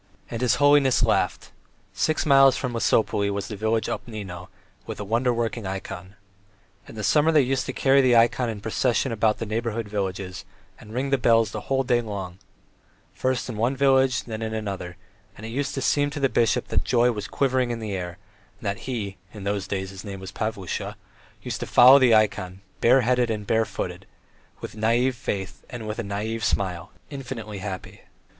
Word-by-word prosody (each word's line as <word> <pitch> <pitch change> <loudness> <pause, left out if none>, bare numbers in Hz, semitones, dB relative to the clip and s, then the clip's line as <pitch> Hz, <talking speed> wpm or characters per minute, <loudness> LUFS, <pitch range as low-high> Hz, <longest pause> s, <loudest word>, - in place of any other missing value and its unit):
And 115 - -4
his 125 -2 +3
holiness 145 -2 +4
laughed. - - 0 0.4
Six 155 - 0
miles 135 -2 +6
from 125 -2 -3
Lesopolye 110 -3 +1
was 100 -1 -3
the 105 - -5
village 110 +2 0
Obnino 95 -6 -6 0.4
with - - -6
a - - -3
wonder 120 +4 +1
working 115 -2 -2
ikon. 95 0 -6 0.7
In - - -11
the 110 - -5
summer 150 +7 +4
they 150 -3 +5
used 130 +1 -1
to - - -1
carry 135 +1 +4
the 125 -2 +4
ikon 120 +1 +3
in 105 -2 -5
procession 120 +4 0
about 110 -1 +1
the 115 - -4
neighbouring 115 0 -2
villages 95 -2 -4 0.4
and 105 - -13
ring 130 +4 -2
the 135 - +3
bells 115 -3 +3
the 105 -1 -7
whole 135 0 +2
day 120 -1 +2
long; 95 -5 -6 0.7
first 125 +6 -1
in 120 -4 -5
one 120 +5 +1
village 135 -2 +3
and 115 - -12
then 110 0 -4
in 110 0 -3
another, 95 -5 -5 0.4
and 110 - -9
it - - -5
used 135 +4 -2
to 135 - -2
seem 145 0 +2
to 145 +1 -6
the 135 -1 +2
bishop 115 -1 +1
then - - +2
that - - -4
joy 120 0 +3
was 105 -3 -5
quivering 130 -2 +1
in 120 - -2
the 110 -3 -5
air, 90 -1 -5 0.4
and 100 -1 -3
he 105 -7 -4 0.2
(in 105 - -8
those 100 -1 -2
days 95 -1 -3
his 95 -1 -9
name 100 -2 -7
was 95 0 -8
Pavlusha) 110 -4 -4 0.5
used - - -4
to - - -5
follow 130 +3 +8
the 125 -4 +5
ikon, 95 -3 0 0.2
bareheaded 125 0 +3
and 105 -2 -3
barefoot, 110 +1 -2 0.6
with - - -7
naïve 115 +4 +2
faith, 100 -5 -5
with 110 -2 -5
a - - -1
naïve 105 +3 -3
smile, 95 -5 -1 0.2
infinitely 120 -7 -6
happy. 95 -1 -7
115 Hz, 190 wpm, -24 LUFS, 100-125 Hz, 0.7 s, follow